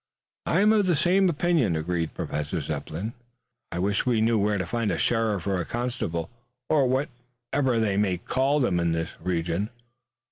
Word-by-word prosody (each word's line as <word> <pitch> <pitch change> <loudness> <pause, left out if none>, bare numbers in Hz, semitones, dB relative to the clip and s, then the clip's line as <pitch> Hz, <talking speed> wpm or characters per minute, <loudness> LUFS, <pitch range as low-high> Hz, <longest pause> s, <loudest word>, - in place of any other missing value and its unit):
"I 170 - +3
am 210 +1 +5
of 205 -3 +3
the 175 - +3
same 185 +4 +3
opinion," 155 - +2
agreed 80 0 -2
Professor 75 +4 -3
Zepplin. 80 +8 -4 0.6
"I - - -4
wish 100 +3 +1
we 120 -3 +2
knew 110 0 +3
where 105 +1 +1
to 90 - -2
find 115 +4 -1
a - - 0
sheriff 110 -6 +1
or 95 -2 0
a - - -4
constable, 120 -9 -3 0.4
or 145 -4 +4
whatever 125 -1 -1
they 105 -3 +1
may 100 -3 +2
call 135 +10 +1
them 95 -10 +2
in 85 -1 +1
this 80 0 -2
region." 85 +3 -1
110 Hz, 175 wpm, -26 LUFS, 85-130 Hz, 0.6 s, am